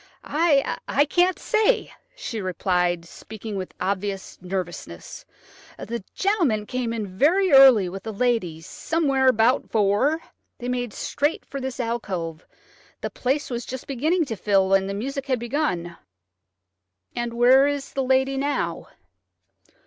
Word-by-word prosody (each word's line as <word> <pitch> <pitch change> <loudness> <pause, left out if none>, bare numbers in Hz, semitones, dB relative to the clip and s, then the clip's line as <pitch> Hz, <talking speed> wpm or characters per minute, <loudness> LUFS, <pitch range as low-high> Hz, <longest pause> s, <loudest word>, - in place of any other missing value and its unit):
"I 290 -2 +1
can't 360 +1 +3
say," 440 +3 +1 0.2
she 230 - -5
replied, 180 -2 0
speaking 215 +4 -8
with 185 -1 -5
obvious 195 +1 -3
nervousness. 175 - -6 0.5
"The 230 -2 -5
gentleman 335 - +1
came 250 0 -2
in 225 -2 -3
very 310 - +2
early 265 -8 +8
with 195 +4 -7
a - - -2
lady, 210 -8 0
somewhere 275 - 0
about 245 +1 +3
four. 220 +9 +2 0.4
They 245 0 -5
made 245 -2 -2
straight 290 +9 -2
for 275 - -6
this 260 0 -5
alcove. 185 -9 -3 0.5
The - - -4
place 270 +2 -1
was 240 0 -3
just 260 +1 -7
beginning 310 +6 0
to 230 - -4
fill, 195 -2 +2
and 195 0 +3
the 200 - -3
music 275 +6 -4
had 260 -2 +1
begun." 235 - -2 1.2
"And 240 -1 -3
where 255 +3 +6
is 285 -1 -3
the 270 - -1
lady 265 +1 +2
now?" 285 +2 -2
240 Hz, 135 wpm, -24 LUFS, 195-275 Hz, 1.2 s, early